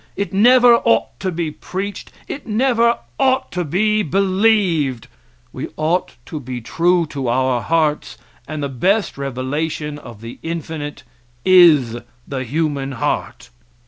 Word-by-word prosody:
It 200 0 -3
never 240 +3 +6
ought 115 - +1
to 190 - -2
be 165 -2 -2
preached; 195 +5 -6 0.2
it 275 - -7
never 235 +1 +2 0.2
ought 260 -1 +2
to 180 - -2
be 210 +7 +1
believed. 190 - +1 0.5
We - - -5
ought 165 +4 0
to 155 - -6
be 130 -2 -6
true 170 +8 +1
to 140 -4 -5
our 125 0 +1
hearts, 155 -2 0 0.3
and 155 -2 -4
the - - 0
best 190 - 0
revelation 145 +3 -3
of 115 -6 -12
the 115 +1 -9
infinite 160 -3 -5 0.4
is 155 -11 +6 0.3
the 130 -2 -3
human 140 0 -2
heart. 115 - -3
160 Hz, 135 wpm, -19 LUFS, 135-195 Hz, 0.5 s, never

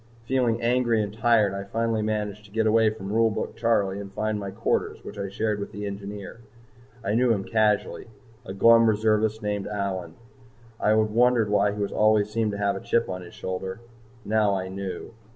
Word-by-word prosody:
Feeling 125 -2 +1
angry 120 -1 +2
and 100 0 -6
tired, 110 -3 +3
I 100 0 -4
finally 115 +2 -1
managed 105 -1 -2
to 100 - -17
get 110 +1 0
away 110 0 +4
from 105 -2 -6
Rule 115 0 +4
Book 110 - -4
Charley 110 -4 +1
and 100 -1 -8
find 110 +1 -2
my 100 -1 -5
quarters 105 +4 -2
which - - -9
I 100 - -3
shared 105 +1 -1
with 100 - -5
the 105 0 -6
Engineer. 100 +1 -7 0.6
I 105 - -1
knew 120 +2 +3
him 100 -4 0
casually, 105 0 0 0.4
a - - -8
glum 115 +4 +6
reservist 110 0 +1
named 105 -1 -2
Allyn. 95 -5 -3 0.6
I - - +1
had 110 0 +2
wondered 120 -2 +3
why 105 0 +3
he 105 0 -1
always 105 0 +2
seemed 110 -1 0
to - - -4
have 100 -1 0
a 95 - -6
chip 115 0 0
on 90 0 -4
his 90 - -12
shoulder. 95 +2 -5 0.5
Now 105 -2 +2
I 95 -1 -3
knew. 95 +2 -6
105 Hz, 195 wpm, -25 LUFS, 100-115 Hz, 0.6 s, glum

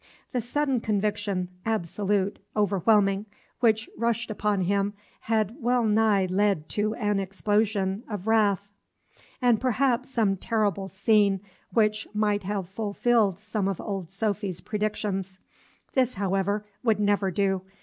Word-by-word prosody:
The 250 - 0
sudden 270 +2 0
conviction, 205 -3 -1
absolute, 205 -1 -1 0.2
overwhelming, 200 0 +2 0.3
which 220 -1 +3
rushed 230 -1 -1
upon 210 -2 0
him, 200 +2 0 0.2
had 220 -1 0
well 245 -1 +2
nigh 215 -3 +3
led 190 -3 +1
to 215 +1 -1
an 210 -3 0
explosion 200 0 0
of 205 -3 -5
wrath, 205 -3 +2 0.8
and 240 -3 +4
perhaps 255 0 +1
some 215 -6 +1
terrible 205 -2 0
scene 200 0 +3 0.3
which 215 -1 +2
might 210 -1 +1
have 195 -1 -3
fulfilled 205 0 +1
some 210 -1 -2
of 195 -3 -2
old 195 -5 -4
Sophy's 200 -2 -2
predictions. 205 -2 -3 0.5
This, 255 -2 +2
however, 200 +1 0 0.2
would 220 -4 +2
never 205 -1 +2
do. 190 0 0
205 Hz, 125 wpm, -26 LUFS, 195-220 Hz, 0.8 s, and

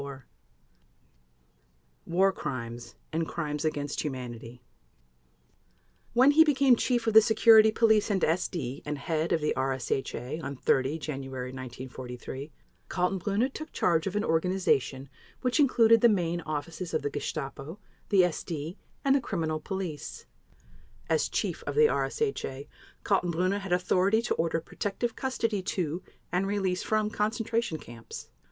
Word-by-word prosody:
War 190 +3 +3
Crimes 120 -7 -6 0.2
and 165 0 0
Crimes 150 -3 -3
against 145 -2 -2
Humanity 125 -3 -6 1.5
When 255 +4 +6
he 320 +2 +7
became 275 -4 +4
Chief 240 0 0
of 225 - +1
the 220 - +10
Security 220 -1 +6
Police 220 -1 +3
and 195 -3 +1
SD 160 -5 -1
and 150 0 -3
Head 160 +3 -1
of 160 - +2
the 150 - +1
RSHA 130 +2 -2
on 140 - -4
30 135 +3 +1
January 135 -4 -5
1943, 130 +2 -7 0.4
Kaltenbrunner 195 +7 0
took 310 - -7
charge 165 0 +1
of 195 - -3
an 210 - +1
organization 160 -6 +1 0.3
which 250 +3 +1
included 230 -5 +5
the 235 - +7
main 175 -4 0
offices 160 +4 -4
of - - 0
the 145 - -1
Gestapo, 145 +3 -5 0.3
the 195 -3 +5
SD, 170 -1 -2 0.3
and 270 - +5
the 280 - +2
Criminal 160 -8 -2
Police. 180 -2 -5 0.9
As - - +2
Chief - - -2
of - - -2
the 455 +1 +6
RSHA, 410 - -1 0.4
Kaltenbrunner 185 0 +1
had 195 -2 -7
authority 185 +4 +2
to 240 - 0
order 165 0 0
protective 205 +7 -3
custody 230 -6 -1
to 175 -2 -2 0.3
and 185 +2 +1
release 195 -2 0
from 215 -1 0
concentration 225 -3 -1
camps. 120 -5 -10
175 Hz, 135 wpm, -28 LUFS, 145-215 Hz, 1.5 s, the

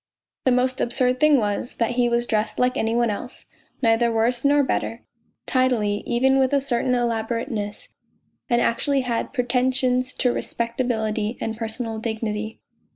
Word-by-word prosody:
The 260 - +4
most 255 +1 +1
absurd 250 +1 +1
thing 305 -1 +5
was, 210 0 -2
that 230 0 0
he 245 0 +2
was 235 0 +1
dressed 215 -2 -1
like 250 0 +2
any 225 -4 0
one 235 -2 +2
else, 245 +5 -7 0.4
neither 230 +1 +3
worse 235 +2 +1
nor 285 0 +4
better, 235 -3 -2 0.4
tidily, 245 -6 +1
even 265 +3 +3
with 265 +1 +2
a 280 - +4
certain 250 -1 0
elaborateness, 225 -3 -2 0.6
and 240 -1 +3
actually 275 +4 +1
had 240 -2 -2
pretentions 255 0 +1
to 250 -2 +1
respect 235 +1 -2
ability 220 -2 -1
and 225 0 -3
personal 225 0 -4
dignity. 220 -1 -3
240 Hz, 155 wpm, -23 LUFS, 225-255 Hz, 0.6 s, thing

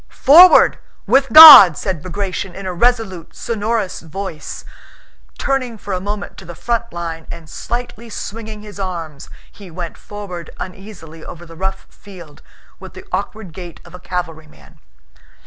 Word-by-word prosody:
"Forward, 350 +6 +7 0.3
with 270 +5 +1
God!" 290 - +11
said 185 -6 -4
Bagratión, 185 0 -6
in 195 - -9
a 185 - -4
resolute, 220 -4 -2
sonorous 220 -3 -4
voice, 165 0 -9 0.7
turning 255 -4 -3
for 200 -1 -7
a 180 - -4
moment 205 +1 -7
to 190 - -13
the 175 0 -11
front 235 +2 -4
line, 165 -1 -7
and 165 -2 -11
slightly 235 +2 -7
swinging 215 0 -8
his 205 -1 -12
arms, 165 -7 -7 0.2
he 200 -3 -15
went 170 0 -8
forward 185 -5 -10
uneasily 180 -4 -11
over 175 0 -11
the 165 0 -14
rough 190 +2 -5
field 175 -7 -15 0.4
with - - -13
the - - -12
awkward 215 -6 -6
gait 175 -1 -11
of 170 - -16
a 180 - -11
cavalryman. 165 -4 -9
190 Hz, 145 wpm, -17 LUFS, 170-220 Hz, 0.7 s, God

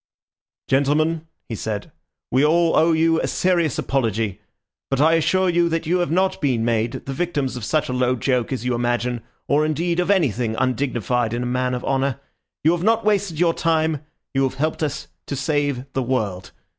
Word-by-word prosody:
"Gentlemen," 155 +4 +1 0.2
he 115 - -5
said, 105 -1 -4 0.4
"we 130 +3 +3
all 165 +2 +3
owe 165 +1 +4
you 165 0 +3
a - - -1
serious 175 -4 +1
apology; 110 -7 -1 0.5
but 135 - 0
I 160 +3 +5
assure 185 +3 +2
you 170 -1 +2
that 165 0 -1
you 180 +3 +1
have 175 - 0
not 185 +4 +1
been 125 -6 +1
made 115 0 -1
the 135 - -4
victims 145 -5 -1
of 125 - -6
such 155 +6 0
a 125 - -3
low 125 0 +1
joke 125 -1 0
as 125 -2 -3
you 125 - +1
imagine, 120 0 -1 0.3
or 145 +2 +3
indeed 170 +3 0
of 180 - 0
anything 125 - +1
undignified 125 -2 0
in 120 - -2
a - - -3
man 125 +1 0
of 125 - -5
honour. 135 0 0 0.4
You 160 - +5
have 175 -1 0
not 225 +2 +2
wasted 200 -6 +1
your 170 -1 +3
time; 160 -3 0 0.3
you 135 - +1
have 135 -1 0
helped 155 +3 -1
to 145 -1 -5
save 140 -2 -1
the 135 - 0
world. 105 -8 -2
140 Hz, 190 wpm, -22 LUFS, 125-165 Hz, 0.5 s, I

